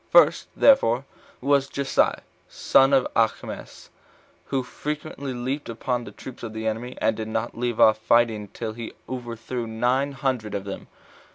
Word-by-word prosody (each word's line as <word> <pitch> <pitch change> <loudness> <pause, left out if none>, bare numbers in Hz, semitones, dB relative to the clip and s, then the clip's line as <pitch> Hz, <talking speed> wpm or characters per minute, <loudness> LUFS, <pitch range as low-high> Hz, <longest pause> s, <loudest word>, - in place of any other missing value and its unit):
First, - - +5
therefore, 135 - +5 0.4
was 140 +1 +2
Jessai, 140 -1 +1
the - - -18 0.3
son 135 +1 +4
of 135 -2 +4
Achimaas, 115 -1 -2 0.6
who 135 -2 -1
frequently 145 +1 -5
leaped 130 +3 -3
upon 120 +1 -2
the - - -9
troops 130 - -10
of 115 -2 -6
the 110 0 -5
enemy, 115 +3 -3
and 110 0 +2
did 110 0 -4
not 110 +1 -2
leave 120 -1 -2
off 110 0 +6
fighting 110 -2 +2
till 110 +2 -5
he 115 0 -7
overthrew 120 -1 -5
nine 125 +5 0
hundred 130 -6 -2
of 100 - -3
them. 100 -1 -7
120 Hz, 160 wpm, -25 LUFS, 110-135 Hz, 0.6 s, off